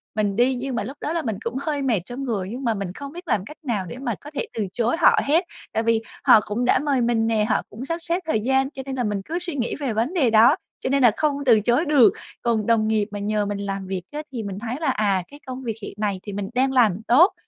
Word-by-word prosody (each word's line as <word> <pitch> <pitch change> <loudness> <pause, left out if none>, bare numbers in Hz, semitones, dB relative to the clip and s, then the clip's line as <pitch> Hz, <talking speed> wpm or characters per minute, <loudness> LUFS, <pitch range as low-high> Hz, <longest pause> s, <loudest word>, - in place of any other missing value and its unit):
mình 205 -2 0
đi 250 +4 +3
nhưng 255 +1 -3
mà - - -1
lúc 275 +3 -7
đó 305 - -2
là 335 - 0
mình 220 -7 -3
cũng 230 +1 -3
hơi 290 -1 -2
mệt 240 -8 +1
trong 245 +5 -6
người 210 -8 -2
nhưng 255 +4 -6
mà 230 -3 +2
mình 195 -3 -4
không 280 +3 -8
biết 350 +2 -10
làm 200 -8 0
cách 300 +7 -11
nào 220 -9 -1
để 180 - -8
mà 245 -5 -2
có 295 - -10
thể - - -1
từ 215 -3 -2
chối 235 +3 +1
họ - - +6
hết. 325 +6 +3 0.3
Tại 225 - 0
vì 230 -1 +2 0.2
họ - - +8
cũng 230 +4 -1
đã - - +4
mời 280 -2 +1
mình 235 -1 +2
nè, 220 -2 +2
họ - - +2
cũng 235 +5 -8
sắp 330 +4 -2
xếp 340 +1 -1
thời 315 -9 +1
gian 265 +3 +2
cho 270 -2 -7
nên 270 -1 -4
là 250 - -1
mình 205 -2 -1
cứ 340 +2 -2
suy 350 -3 -5
nghĩ 240 -4 -1
về 270 -6 -1
vấn 230 +10 0
đề 295 -10 +3
đó 225 +6 +6 0.2
cho - - -3
nên 275 -1 +2
là 240 - +7
không 300 -2 +1
từ 230 -4 +6
chối 240 - +2
được. 290 -6 +5 0.3
Còn 225 -3 +1
đồng 225 -2 +3
nghiệp 215 -2 +2
mà 205 - -5
nhờ 210 +1 0
mình 205 0 -3
làm 195 -1 -4
việc 190 -1 -3
á 300 +1 -4
thì 235 -4 -4
mình 200 0 -5
thấy 235 +2 -4
là, 300 - +1
à, 200 -6 +1
cái 285 - -14
công 260 0 -6
việc 225 -3 -3
hiện - - -7
này 205 -3 -1
thì 205 - -6
mình 195 0 -4
đang 265 +1 +2
làm 220 -7 +3
tốt, 320 +11 +6
240 Hz, 290 wpm, -23 LUFS, 215-275 Hz, 0.3 s, họ